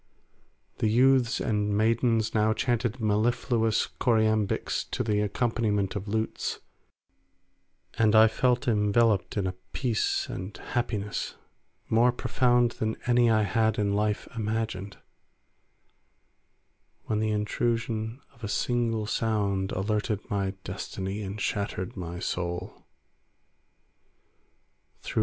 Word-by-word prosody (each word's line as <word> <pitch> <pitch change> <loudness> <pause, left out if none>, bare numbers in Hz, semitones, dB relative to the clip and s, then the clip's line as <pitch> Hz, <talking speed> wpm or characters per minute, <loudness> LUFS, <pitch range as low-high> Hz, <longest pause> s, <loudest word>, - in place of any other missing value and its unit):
The - - +2
youths 125 +1 +4
and 105 -3 0
maidens 115 0 +2
now 110 0 +3
chanted 120 -1 -1
mellifluous 110 +1 +1
choriambics 110 -3 +1
to - - -1
the 105 -2 +1
accompaniment 105 -2 0
of 100 0 -4
lutes, 110 +2 -2 1.4
and 110 -1 +4
I 110 +1 +8
felt 125 +4 +1
enveloped 105 -2 +2
in 100 - +1
a 95 - 0 0.2
peace 120 -5 0
and 95 +3 -6
happiness 105 -4 -3 0.5
more 120 +2 +4
profound 120 -1 +2
than 110 0 0
any 120 -1 +4
I 110 -1 +4
had 110 +1 +1
in 100 -1 +1
life 105 0 0
imagined, 105 -3 -3 2.1
when 105 - -1
the 110 0 0
intrusion 110 +2 -1
of 115 - -22
a - - -2
single 115 0 0
sound 100 -3 0
altered 105 +2 -1
my 100 -1 -1
destiny 95 +1 -5
and 100 +1 -5
shattered 100 -2 -2
my 85 -1 -5
soul. 90 0 -4
110 Hz, 105 wpm, -27 LUFS, 105-115 Hz, 2.1 s, I